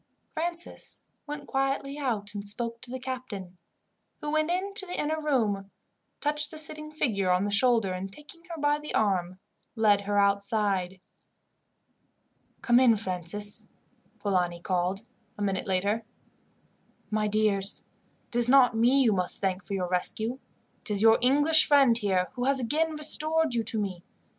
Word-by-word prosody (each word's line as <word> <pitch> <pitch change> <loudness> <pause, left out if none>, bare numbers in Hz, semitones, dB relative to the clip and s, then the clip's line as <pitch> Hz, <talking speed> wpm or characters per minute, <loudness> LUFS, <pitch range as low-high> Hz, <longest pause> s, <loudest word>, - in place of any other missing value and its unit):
Francis 340 +1 -4 0.2
went 290 0 -6
quietly 275 +1 -2
out 215 -7 -2
and 205 -1 -5
spoke 230 +3 -1
to - - -8
the 260 +1 -5
captain, 235 -9 -7 0.6
who 295 - -4
went 310 +1 +1
in 375 +3 -2
to 395 -2 0
the 355 - -4
inner 310 +1 -1
room, 215 -10 0 0.5
touched 295 0 +1
the 315 - -9
sitting 305 0 +2
figure 215 -11 -1
on 180 +1 +2
the 205 - -2
shoulder, 225 -3 +2
and, 190 +1 -6
taking 300 +7 -14
her 335 -2 -8
by 290 0 +1
the 300 - -6
arm, 185 -4 0 0.4
led 210 -3 +3
her 205 0 -2
outside. 200 -2 0 1.6
"Come 240 0 +4
in, 240 -4 +5
Francis," 200 +1 -4 0.5
Polani 180 -4 -1
called 185 +4 -2 0.3
a 205 - -3
minute 195 -1 -2
later. 200 +4 0 1.1
"My 215 0 0
dears, 205 -2 +1 0.5
it - - -13
is 240 0 +4
not 255 -3 +5
me 250 +5 +4
you 225 -4 +3
must 180 -2 -1
thank 190 -1 -2
for 195 +4 -5
your 185 -2 -2
rescue. 220 +7 -2 0.4
It - - -6
is 205 0 +2
your 225 0 +6
English 290 +5 +5
friend 275 -5 +5
here 190 -5 0
who 250 -1 -3
has 275 0 +2
again 310 +6 0
restored 310 0 +3
you 235 - +1
to 220 - 0
me. 185 -4 -4
225 Hz, 160 wpm, -27 LUFS, 200-285 Hz, 1.6 s, your